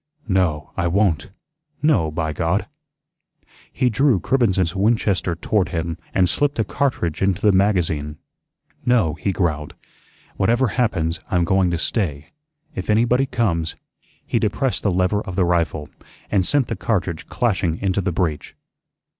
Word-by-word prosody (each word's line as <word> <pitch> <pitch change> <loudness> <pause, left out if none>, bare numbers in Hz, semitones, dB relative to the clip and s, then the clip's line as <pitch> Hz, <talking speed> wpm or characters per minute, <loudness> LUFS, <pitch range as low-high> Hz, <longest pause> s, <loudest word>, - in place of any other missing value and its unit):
No, 90 -7 0
I 85 - 0
won't. 90 -2 +1 0.5
No, 125 - +3
by 80 0 -2
God!" 85 +6 0 1.1
He 130 - +1
drew 125 -2 +3
Cribbens's 95 -8 +1
Winchester 100 -3 +1
toward 95 +2 0
him 85 -1 -2 0.2
and 90 -1 +3
slipped 145 +9 +1
a 110 - +2
cartridge 105 - -1
into 95 -2 +1
the 105 - +6
magazine. 85 -7 +1 0.7
"No," 115 -11 +2
he 80 +5 -2
growled. 80 -5 -2 0.6
"Whatever 120 +5 +2
happens, 85 -9 0
I'm 90 -1 +2
going 95 +1 +2
to 85 - -1
stay. 80 -6 -2 0.4
If 95 - -6
anybody 120 +5 +3
comes 85 -11 -1 0.2
" - - -36
He - - 0
depressed 120 +5 0
the 105 - +1
lever 90 +3 +1
of 95 - -6
the 95 - +2
rifle, 80 -4 0 0.4
and 95 -3 +2
sent 145 -3 +2
the 115 - -3
cartridge 95 -6 -2
clashing 95 -8 0
into 100 +1 0
the 95 0 -1
breech. 80 -4 -2
95 Hz, 145 wpm, -21 LUFS, 85-110 Hz, 1.1 s, the